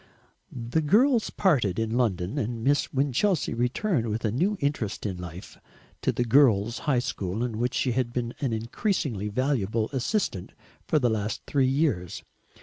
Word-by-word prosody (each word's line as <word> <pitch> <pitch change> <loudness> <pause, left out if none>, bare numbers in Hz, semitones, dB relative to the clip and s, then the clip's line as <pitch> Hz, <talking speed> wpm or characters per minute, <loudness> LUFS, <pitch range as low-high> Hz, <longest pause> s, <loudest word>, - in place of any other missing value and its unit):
The 120 +6 -1
girls 230 - +3
parted 125 - +1
in 115 0 -1
London, 105 -1 0
and 115 -2 -3
Miss 145 +3 +2
Winchelsea 140 - +1
returned, 125 - 0
with 110 +2 -2
a 105 - +1
new 185 - +1
interest 140 -10 -2
in 95 -3 -2
life, 90 +1 -9 0.4
to - - +1
the 120 - 0
Girls' 115 -3 +4
High 135 - +3
School 105 -3 -2
in 115 -3 -3
which 120 +1 0
she 130 - +1
had 120 0 0
been 120 -1 -3
an 135 -4 -1
increasingly 115 - -1
valuable 115 -2 0
assistant 135 - -1 0.3
for - - +2
the 125 -5 +2
last 105 -1 -2
three 135 -3 +2
years. 130 - 0
120 Hz, 160 wpm, -26 LUFS, 110-145 Hz, 0.4 s, Girls